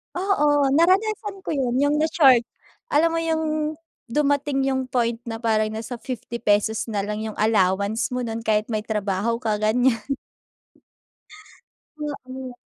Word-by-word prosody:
Oo, 295 -7 +2
naranasan 390 +5 +2
ko - - -4
yun, 260 -5 0
yung 285 +3 +2
na-short. 275 -7 +4 0.4
Alam 330 -4 +3
mo 330 - 0
yung 315 -1 -1 0.3
dumating 285 +1 +1
yung 265 -1 0
point 235 -2 0
na 225 +1 -5
parang 215 -1 +2
nasa 230 +2 -6
₱50 235 0 -6
pesos 210 +2 +1
nalang 210 0 -2
yung 220 -1 -5
allowance 205 +2 +1
mo 250 - -1
nun 225 -1 -3
kahit 220 0 0
may 215 - 0
trabaho 210 +1 -1
ka, 215 -2 -1
ganyan. 230 +2 +2 2.0
Oo. 260 -3 -6
250 Hz, 130 wpm, -23 LUFS, 220-295 Hz, 2.0 s, na-short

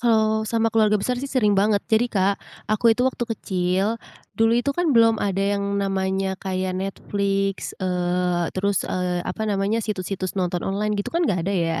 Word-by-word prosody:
Kalau 220 -2 +2
sama 225 -1 +1
keluarga 215 -1 +4
besar 250 +5 -1
sih, 275 - -4
sering 220 -7 +2
banget. 205 0 +2
Jadi, 225 +2 +4
Kak, 195 -1 +1 0.3
aku 225 +1 +4
itu 250 - 0
waktu 255 -2 0
kecil, 190 +4 0 0.4
dulu 225 +1 +4
itu 260 +4 +1
kan 335 -5 +1
belum 225 -1 +5
ada 195 -1 0 0.2
yang 200 0 -2
namanya 190 -1 -1
kayak 185 -1 -2
Netflix, 195 0 -2
eee, 180 -1 0
terus, 200 +1 0
eee, 180 -1 -1
apa 220 - -3
namanya, 210 +2 0
situs-situs 190 -2 -3
nonton 180 -1 -1
online 210 +2 -1
gitu 205 - -3
kan, 340 -1 +1
nggak 175 -4 0
ada, 200 - -1
ya. 165 -3 0
200 Hz, 180 wpm, -23 LUFS, 185-220 Hz, 0.4 s, belum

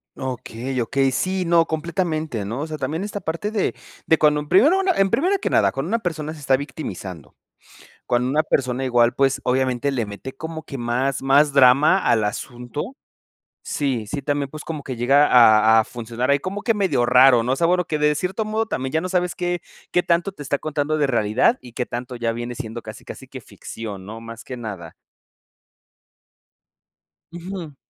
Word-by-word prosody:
Okey, 130 0 -4
okey. 135 +3 +1
Sí, 185 +7 -1
no, 170 -1 +4
completamente, 160 - -2
¿no?, 115 +7 -4
o 155 - -3
sea, 155 -1 -5
también 160 +6 -3
esta 205 0 -4
parte 170 +4 -3
de 215 -3 -1 0.3
de 160 - +5
cuando 150 -1 +3
en 150 0 -7
primero 290 - +5
una 385 -1 +2
en 195 -6 +2
primero 365 +7 +2
que - - -2
nada, - - +3
cuando 135 +5 -4
una 230 +2 +1
persona 160 -5 -4
se 160 - -12
está 135 -2 +2
victimizando. 95 - -7 0.7
Cuando 125 +1 +1
una 150 +3 +2
persona 130 -4 -1
igual, 120 -1 +3
pues, 135 0 +1
obviamente 130 +1 +1
le 120 -5 -2
mete 105 +6 -8
como 160 +2 -7
que 135 -1 -8
más, 125 +3 -1
más 140 +2 +4
drama 140 +6 +6
al 110 -3 +2
asunto. 125 - -5 0.7
Sí, 130 -7 -2
sí, 140 +7 -4
también, 145 0 -1
pues, 155 0 -8
como 155 -3 -5
que 130 -2 -6
llega 135 +5 +4
a 110 -2 +6
a 110 - -1
funcionar 120 +2 -3
ahí, 140 - +4
como 195 +5 -4
que 230 - +2
medio 170 - +1
raro, 125 -1 +6
¿no?, 125 +3 0
o - - 0
sea, 165 - +2
bueno, 180 +1 +2
que 155 - -2
de 150 0 +3
cierto 185 +7 -2
modo 215 +1 -1
también 130 -10 -3
ya 160 - +1
no 185 - -4
sabes 180 -1 0
qué 175 0 -2 0.3
qué 180 - +2
tanto 170 +2 +1
te 150 - -10
está 140 0 -1
contando 155 0 -1
de 145 - +2
realidad, 120 - +2
y 120 - -12
qué 125 +1 -3
tanto 125 +1 -6
ya 115 -1 -1
viene 120 +1 -5
siendo 120 -2 -6
casi - - -10
casi - - -9
que - - -9
ficción, 105 -4 -8
¿no?, 110 +3 -8
más 115 +1 -10
que 125 - -7
nada. 100 -8 -7 2.4
Ujú. 175 -4 -7
140 Hz, 200 wpm, -22 LUFS, 120-165 Hz, 2.4 s, drama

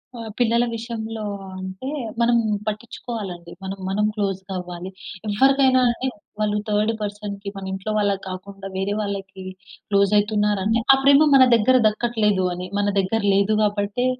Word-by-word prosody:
ఆ! 235 - -8 0.2
పిల్లల 235 0 +3
విషయంలో 225 -1 -5 0.4
అంటే 190 +7 -7 0.3
మనం 235 0 +4 0.3
పట్టిచ్చుకోవాలండి. 210 -5 -5
మనం, 190 +1 -5
మనం 210 +2 +1
క్లోస్‌గా 195 -2 -3
అవ్వాలి. 180 0 -7 0.4
ఎవ్వరికైనా 265 +4 +4
అండి 240 +2 -1 0.3
వాళ్ళు 210 0 +1
థర్డ్ 210 +2 +2
పర్సన్‌కి 205 -1 -5
మన 195 - -6
ఇంట్లో 190 +3 -4
వాళ్ళకి 200 -2 0
కాకుండా 195 +1 -8
వేరే 195 +2 -1
వాళ్ళకి 195 -2 -5 0.5
క్లోజ్ 200 -1 +3
అయితున్నారంటే 210 +1 +1
ఆ - - +6
ప్రేమ 280 +2 +6
మన 260 -1 +8
దగ్గర 245 +4 +4
దక్కట్లేదు 210 -4 +1
అని. 180 +1 -6
మన 205 - +1
దగ్గర 200 +4 0
లేదు 200 +2 +3
గాబట్టే 205 +3 0
205 Hz, 140 wpm, -22 LUFS, 195-225 Hz, 0.5 s, మన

